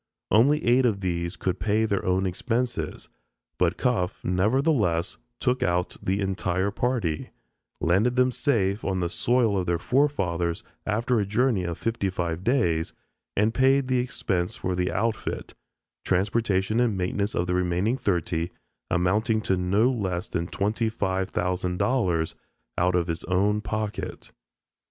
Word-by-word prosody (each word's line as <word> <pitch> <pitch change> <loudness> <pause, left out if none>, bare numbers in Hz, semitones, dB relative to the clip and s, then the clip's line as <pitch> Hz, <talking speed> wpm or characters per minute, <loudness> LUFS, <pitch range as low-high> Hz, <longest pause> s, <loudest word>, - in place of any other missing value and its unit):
Only 145 +8 +4
eight 125 +2 +4
of 110 -5 +1
these 85 -1 -2
could 90 +1 -2
pay 110 +1 +2
their 100 -3 -1
own 95 +1 +1
expenses, 120 +6 -2 0.5
but 90 +2 +2
Cuffe, 105 -8 0
nevertheless, 100 - +1 0.2
took 125 0 +1
out 90 -4 0
the 95 +2 0
entire 95 0 0
party, 105 -10 -1 0.5
landed 100 +9 +2
them 125 0 +3
safe 110 -7 0
on 95 -1 -1
the 85 -1 0
soil 120 +2 +2
of 95 -2 -1
their 85 0 +2
forefathers 90 - 0 0.2
after 115 +3 +1
a 100 - +1
journey 110 -1 +2
of 85 -1 -3
fifty 115 -4 -1
five 85 -2 -3
days 95 -10 +1 0.4
and 105 +3 +3
paid 135 +1 +3
the 130 -1 +2
expense 100 -8 -2
for 90 - -2
the 90 0 0
outfit, 110 +2 -2 0.5
transportation 100 +2 +1
and 115 -5 +2
maintenance 100 +3 -1
of 85 - +1
the 90 - -1
remaining 90 +5 +1
thirty, 85 - -1 0.4
amounting 105 +5 +2
to 95 - +1
no 100 +7 +2
less 95 -7 -2
than 85 -1 -2
twenty 105 +5 0
five 95 -3 -1
thousand 90 0 -1
dollars 90 -10 +1
($25,000), - - -34 0.5
out 90 - +2
of 90 -1 +2
his 85 -1 -3
own 100 +4 +1
pocket. 110 0 -4
100 Hz, 150 wpm, -26 LUFS, 90-115 Hz, 0.5 s, Only